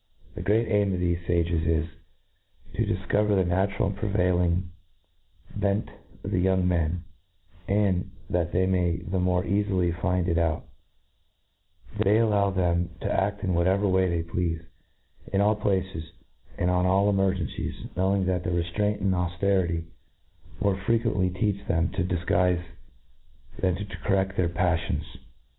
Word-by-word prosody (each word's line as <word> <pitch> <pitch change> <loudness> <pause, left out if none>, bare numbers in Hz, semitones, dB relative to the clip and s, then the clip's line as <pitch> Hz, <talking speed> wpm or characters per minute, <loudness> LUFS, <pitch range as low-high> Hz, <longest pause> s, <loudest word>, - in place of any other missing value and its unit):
The - - -6
great 110 +5 +2
aim 100 -3 +2
of - - -3
thefc 85 -1 -1
fages 85 -1 +1
is, 80 -1 +2 0.9
to - - 0
difcover 105 0 +1
the 95 -1 +3
natural 95 +3 +1
and 100 - -4
prevailing 90 -3 +1 0.8
bent 100 +1 0 0.3
of - - -4
the 90 - +1
young 95 0 +2
men 85 -1 0 0.6
j 100 - +1
and, 95 0 -1 0.2
that 85 -1 0
they 95 +1 +2
may 90 -2 +1
the 95 +2 -3
more 90 0 +1
cafily 95 -3 +1
find 90 -2 +1
it 85 -2 +2
out, 80 -1 0 1.3
they 100 +2 +4
allo^ 105 -3 +3
them 85 -1 +1
to - - -1
aft 100 +1 0
in 95 -3 0
whatever 95 +4 +2
way 95 -1 +3
they 85 -1 -1
plcafc, 85 -1 -2 0.7
in 95 - +1
all 105 +1 +4
places, 95 -5 -2 0.5
and 90 - +1
on 90 0 +2
all 95 +2 +3
emergencies, 95 -6 -1
knowing 95 +1 +1
that 90 -1 0
rcftraintiand 90 +5 -1
aufterity 90 -1 0 0.8
more 100 -2 +1
fre 100 +4 0
quently 110 -6 +1
teach 100 -2 0
them 85 -1 +1
to 95 - -2
difguife 90 0 +1 1.0
than 90 -2 +1
to 105 - -5
correft 95 -1 -1
their 90 -3 +1
paflions. 90 -1 0
90 Hz, 145 wpm, -26 LUFS, 85-100 Hz, 1.3 s, they